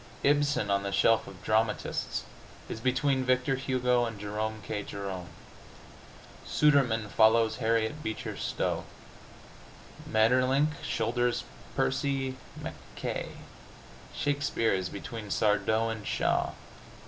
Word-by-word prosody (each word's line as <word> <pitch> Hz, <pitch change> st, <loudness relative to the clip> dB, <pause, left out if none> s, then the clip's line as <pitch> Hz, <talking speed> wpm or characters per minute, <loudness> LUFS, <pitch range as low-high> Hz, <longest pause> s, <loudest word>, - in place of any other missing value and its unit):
Ibsen, 145 Hz, -7 st, +2 dB
on 100 Hz, 0 st, +2 dB
the 100 Hz, 0 st, -3 dB
shelf 115 Hz, +3 st, +3 dB
of 95 Hz, -2 st, -11 dB
dramatists, 110 Hz, 0 st, 0 dB, 0.4 s
is -, -, -5 dB
between 130 Hz, +2 st, +1 dB
Victor 130 Hz, +1 st, +2 dB
Hugo 125 Hz, -2 st, +1 dB
and 115 Hz, -3 st, -5 dB
Jerome 110 Hz, +1 st, -3 dB
K. 105 Hz, -2 st, -2 dB
Jerome. 95 Hz, -3 st, -5 dB, 1.1 s
Sudermann 130 Hz, -8 st, +3 dB
follows 110 Hz, +1 st, +4 dB
Harriet 115 Hz, +4 st, 0 dB
Beecher 110 Hz, -6 st, -4 dB
Stowe. -, -, -2 dB, 1.2 s
Maeterlinck 130 Hz, +6 st, +3 dB
shoulders 120 Hz, +2 st, 0 dB, 0.3 s
Percy 135 Hz, -2 st, 0 dB, 0.2 s
Mackaye. -, -, -6 dB, 0.7 s
Shakespeare 145 Hz, -6 st, +1 dB
is 95 Hz, -1 st, -1 dB
between 105 Hz, +1 st, -7 dB
Sardou 110 Hz, +2 st, +2 dB
and 110 Hz, -2 st, -6 dB
Shaw. -, -, +1 dB
115 Hz, 100 wpm, -29 LUFS, 110-130 Hz, 1.2 s, follows